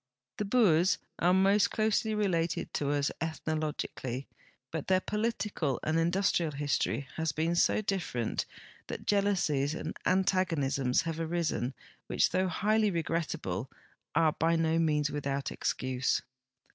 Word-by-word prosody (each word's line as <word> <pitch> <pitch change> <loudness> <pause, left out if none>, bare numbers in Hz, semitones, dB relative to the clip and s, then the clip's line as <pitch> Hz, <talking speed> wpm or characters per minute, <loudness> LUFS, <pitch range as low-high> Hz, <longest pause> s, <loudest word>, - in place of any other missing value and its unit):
The 210 - -1
Boers 195 -6 +4 0.2
are 175 - +4
most 195 +2 +4
closely 220 0 +1
related 175 -6 0
to 145 - -1
us 145 -1 +1
ethno 160 -1 -2
logically, 135 -4 -4 0.5
but 160 -3 -4
their 185 -1 +4
political 210 - -1
and 160 +1 +1
industrial 170 -2 +1
history 140 -1 -1
has 160 -1 0
been 160 +4 0
so 175 - +3
different 175 - -2 0.4
that - - -6
jealousies 175 -8 +1
and 160 0 -5
antagonisms 165 -8 +2
have 165 -1 -3
arisen 160 -6 -1 0.3
which, - - +2
though 185 +1 +2
highly 215 +3 +2
regrettable, 160 - -2 0.5
are 160 -1 +4
by 165 +1 +2
no 165 0 +2
means 150 -3 +1
without 140 -1 -2
excuse. 130 0 -1
165 Hz, 130 wpm, -30 LUFS, 145-190 Hz, 0.5 s, Boers